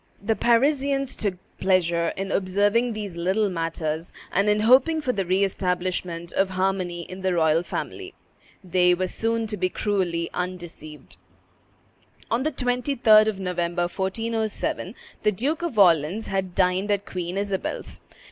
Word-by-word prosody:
The 220 +2 0
Parisians 275 +4 +2
took 200 -4 -2 0.2
pleasure 170 -3 +2
in 195 0 -3
observing 205 +5 +1
these 205 -4 -5
little 190 +5 +1
matters, 165 -2 -3 0.2
and 200 +2 +2
in 210 0 +2
hoping 265 +8 +5
for 260 -5 -1
the 195 -4 -2
re 190 +2 +2
establishment 180 -2 -2
of 195 0 +2
harmony 185 -2 -1
in 185 +3 -9
the 185 -1 0
royal 160 -1 +3
family. 380 - -6 0.5
They 180 0 +3
were 185 +1 -1
soon 225 +4 -1
to 210 -1 -4
be 185 0 0
cruelly 180 -5 -1
undeceived. 175 -4 -7 1.1
On 230 +2 +2
the 310 +3 0
23d 245 -4 +3
of 210 -3 -1
November, 175 -2 -1
1407, 220 +4 -2 0.3
the 210 - +3
Duke 280 - -1
of 340 -10 -3
Orleans 180 +2 +4
had 190 -2 -3
dined 185 +2 +2
at 205 -1 0
Queen 180 0 -4
Isabel's. 200 -1 -3
195 Hz, 145 wpm, -24 LUFS, 180-220 Hz, 1.1 s, hoping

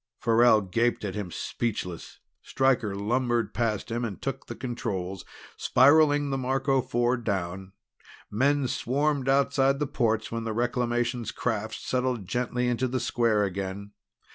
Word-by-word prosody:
Farrell 115 -1 +4
gaped 115 +4 0
at 95 - -3
him, 105 -3 -4
speechless. 90 -2 -4 0.2
Stryker 125 -6 +1
lumbered 120 +3 0
past 115 -3 -1
him 120 +1 -1
and 105 -6 -4
took - - -5
the - - -6
controls, 105 -7 -4 0.3
spiraling 145 +1 +4
the 135 - -1
Marco 135 +1 +1
Four 120 0 0
down. 95 -4 -3 0.6
Men 140 +4 +2
swarmed 140 +2 0
outside 135 0 +3
the 150 - -1
ports 110 -5 0
when 115 0 -3
the 110 -1 -3
Reclamations 120 0 -1
craft 110 -2 -2
settled 125 -5 -2
gently 125 +3 -1
to 130 - 0
the 130 +1 -2
square 115 -4 +1
again. 100 +1 -4
120 Hz, 140 wpm, -27 LUFS, 105-130 Hz, 0.6 s, Farrell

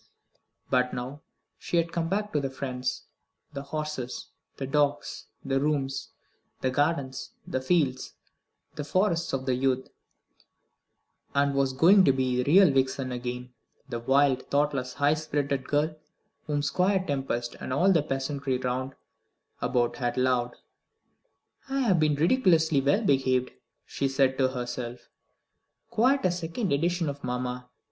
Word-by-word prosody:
But 125 0 +2
now 130 +4 -6 0.4
she 175 - -1
had 170 0 +1
come 165 -1 -1
back 210 +2 -1
to 150 - +2
the 135 -1 -2
friends, 130 -1 -4 0.5
the 140 - -4
horses, 145 -3 -5 0.3
the 135 - -3
dogs, 145 +1 0 0.2
the 135 0 +1
rooms, 140 -2 -1 0.5
the 130 - +1
gardens, 140 -1 -1
the 130 - -2
fields, 130 -3 0 0.6
the 150 -2 -5
forests 170 +2 +1
of 130 0 -3
youth, 130 0 0 1.5
and 140 0 +3
was 135 -1 +1
going 185 +8 +6
to - - +6
be 130 -1 0
the 140 - 0
real 190 -2 +7
Vixen 130 -1 0
again; 125 0 -5 0.4
the 120 -2 -3
wild, 135 +1 +2
thoughtless, 140 -3 0
high 145 +1 +3
spirited 145 -3 -2
girl 150 +2 +1 0.5
whom 145 -1 0
Squire 185 +5 +1
Tempest 135 -5 -2
and - - -6
all 175 +9 +4
the 165 -5 +4
peasantry 135 -1 -2
round 130 +1 -3 0.7
about 125 -1 +1
had 120 -2 -2
loved. 125 -1 +1 1.1
"I 270 0 0
have 195 -9 +3
been 155 -1 +3
ridiculously 160 - +3
well 145 +11 +2
behaved," 130 -6 +2 0.3
she 140 - -1
said 135 0 +1
to 130 - +4
herself, 120 -1 -5 0.8
"quite 250 +2 +3
a 185 - +4
second 175 +3 -2
edition 170 +3 +1
of 140 0 -5
mamma. 125 0 -3
140 Hz, 140 wpm, -27 LUFS, 130-155 Hz, 1.5 s, real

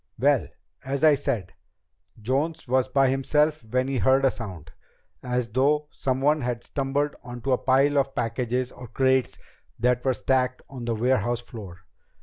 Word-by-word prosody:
"Well, - - +3 0.4
as 135 +2 -3
I 155 -1 +7
said, 125 - -2 0.7
Jones 135 +9 -1
was 130 +1 +2
by 135 +1 +3
himself 150 +2 +1
when 125 +4 -1
he 135 -2 -1
heard 135 +2 +4
a 135 - +4
sound, 90 -9 -8 0.5
as 125 -1 -2
though 150 +5 +1
someone 140 +3 +1
had 120 -1 -3
stumbled 140 +1 -1
into 125 +1 -4
a 130 - +3
pile 140 +2 +3
of 135 0 -1
packages 125 +2 -1
or 125 - -10
crates 130 +2 +1 0.4
that 125 +1 +1
were 130 -2 +1
stacked 130 0 0
on 125 -3 -7
the 115 -1 -1
warehouse 120 0 +1
floor. 100 -8 -10
130 Hz, 155 wpm, -25 LUFS, 120-135 Hz, 0.7 s, I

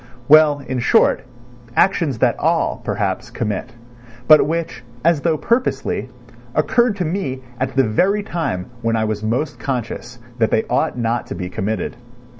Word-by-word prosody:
Well, 150 -1 +6
in 130 -2 -3
short, - - +3 0.5
actions 165 - +2
that - - +2
all, - - +1
perhaps, - - -2
commit; 105 -3 -3 0.5
but 155 -2 +7
which, 165 -5 -3 0.2
as 165 -3 +3
though 160 -1 +1
purposely, 235 - -1 0.5
occurred 240 -3 +2
to 185 -3 -2
me 150 -7 -3 0.2
at 130 0 -2
the 135 - +4
very 185 - +1
time 160 - -3 0.2
when 115 -1 0
I 110 -1 +1
was 110 -1 -2
most 125 +7 -2
conscious 125 -1 -4 0.2
that 110 - +3
they 110 - +2
ought - - +1
not 120 0 -1
to 135 - -5
be 90 -2 -5
committed. 110 +5 -3
135 Hz, 155 wpm, -19 LUFS, 115-165 Hz, 0.5 s, but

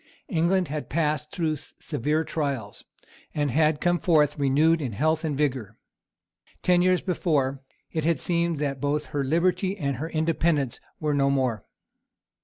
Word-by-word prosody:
England 180 0 +2
had 150 +1 -5
passed 150 -1 0
through 160 -4 -1
severe 150 +4 -2
trials, 140 -11 -3 0.5
and 145 -2 0
had 155 +2 +2
come 175 +1 +2
forth 150 -4 +3
renewed 150 +4 +3
in 125 -6 -3
health 155 +8 +1
and 150 -4 -1
vigour. 130 -8 -1 0.9
Ten 180 -1 +4
years 185 0 +3
before, 145 -7 0 0.3
it 160 - -2
had 165 -2 +1
seemed 170 -2 0
that 140 -2 -2
both 145 +1 0
her 145 -1 0
liberty 180 +6 +1
and 140 -7 -2
her 160 +5 -4
independence 160 -4 0 0.2
were 150 -1 0
no 140 -1 +2
more. 130 -6 0
150 Hz, 150 wpm, -26 LUFS, 140-165 Hz, 0.9 s, Ten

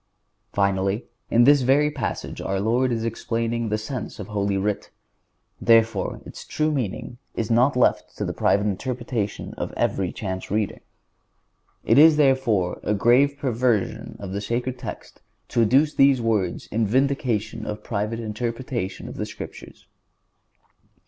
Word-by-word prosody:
Finally, 100 +2 0 0.2
in 120 - +5
this 145 +2 +6
very 140 +4 +3
passage 135 -7 -4
our 95 0 -1
Lord 120 +5 +1
is 115 -1 -1
explaining 115 0 -2
the 105 - 0
sense 120 +4 -5
of - - -7
Holy 100 -1 0
Writ; 100 +1 -2 0.7
therefore, 115 -1 +3
its - - -9
true 155 0 -1
meaning 120 -2 -3 0.2
is 115 0 -2
not 125 +4 +4
left 125 - +1
to - - -2
the - - -3
private 100 +1 +2
interpretation 115 0 -3
of - - -3
every 95 -3 0
chance 95 -3 -5
reader. 105 0 -1 1.1
It - - +5
is, 155 0 +8
therefore, 130 -10 +2
a 105 - 0
grave 130 +7 +4
perversion 120 -6 0
of 100 -2 -6
the 100 +1 -3
sacred 125 +4 -2
text - - -8 0.3
to 120 - +2
adduce 135 +7 +4
these 135 -1 +5
words 110 -6 0
in 110 0 +1
vindication 115 -3 0
of 105 0 -5
private 110 +1 -2
interpretation 115 -1 -4
of - - -8
the - - -2
Scriptures. - - -10
115 Hz, 145 wpm, -24 LUFS, 105-130 Hz, 1.1 s, is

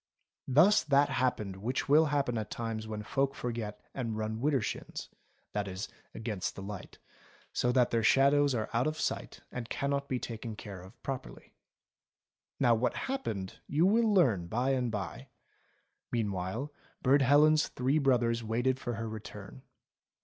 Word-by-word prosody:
Thus 165 +11 +6
that 140 -1 +4
happened 105 -7 0
which 125 +5 -2
will 150 +3 +6
happen 140 -4 0
at 105 - -5
times 115 -1 -4
when 105 -1 -4
folk 135 +4 0
forget 110 -4 -4
and 115 -5 -3
run 110 0 -2
wider 145 0 +3
shins, 110 - -5 0.4
that 105 -1 -1
is 95 +2 -5 0.3
against 110 -4 -3
the 95 - -7
light, 100 -1 -8 0.6
so 125 - +2
that 125 -1 +3
their 115 - +2
shadows 140 +3 +4
are 110 -2 -1
out 120 +5 +2
of 155 0 -2
sight - - -3
and 120 -2 -5
cannot 140 0 -1
be 130 - 0
taken 115 -2 -5
care 100 -3 -8
of 95 +1 -14
properly. 135 -2 -6 1.1
Now 120 -4 +5
what 115 +2 +1
happened 110 - -3
you 155 +4 +3
will 220 +3 +4
learn 120 - +3
by 125 +8 0
and 125 -2 +1
by; 100 -5 -5 0.8
mean 110 -4 0
while, 100 +11 -3 0.3
Burd 140 +2 +5
Helen's 150 +3 +5
three 130 +5 +1
brothers 120 -4 +2
waited 120 +4 0
for 120 -3 -3
her 115 +1 -4
return. 110 - -8
120 Hz, 160 wpm, -31 LUFS, 110-140 Hz, 1.1 s, Thus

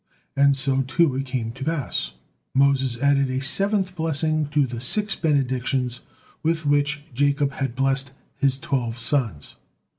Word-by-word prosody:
And 140 0 +4
so, 135 -1 +1
too, 135 +3 +2
it 135 +1 -3
came 125 -3 -3
to 135 +3 -8
pass. 140 - -2 0.4
Moses 135 -3 +2
added 140 -1 +3
a 130 0 -1
seventh 190 +6 +2
blessing 155 -2 0
to 145 -1 +2
the 120 -2 -6
six 210 - +1
benedictions 130 -4 0 0.4
with 165 0 -1
which 145 0 +1
Jacob 140 +2 +1
had 135 -3 -3
blessed 135 0 0 0.2
his 135 -2 +1
twelve 125 -4 -2
sons. 115 - -1
135 Hz, 145 wpm, -23 LUFS, 130-150 Hz, 0.4 s, And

